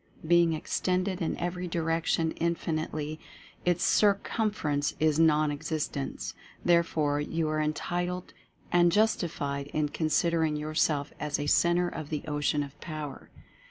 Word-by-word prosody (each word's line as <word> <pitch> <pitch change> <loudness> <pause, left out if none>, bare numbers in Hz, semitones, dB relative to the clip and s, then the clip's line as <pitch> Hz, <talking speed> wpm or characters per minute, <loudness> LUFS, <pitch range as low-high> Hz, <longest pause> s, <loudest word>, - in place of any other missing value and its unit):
Being 170 0 +4
extended 185 +4 -1
in 165 - -1
every 180 +1 -3
direction 165 -1 0
infin 165 -1 -1
itely, 155 0 -5 0.5
its 175 -1 +2
circumference 200 -8 +1
is 155 -1 +3
nonexistent. 150 -2 0 0.3
Therefore 160 -4 +2
you 160 +2 -1
are 155 0 0
entitled 175 +4 -2 0.4
and 175 0 +5
justified 155 -9 0
in 150 0 -1
considering 160 0 +1
yourself 150 -1 0
as 150 -1 -1
a 145 - -3
Centre 175 +4 +3
of 155 -4 -6
the 150 -2 -3
Ocean 145 0 0
of 140 +1 -11
Power. 155 -3 -6
160 Hz, 125 wpm, -29 LUFS, 150-175 Hz, 0.5 s, and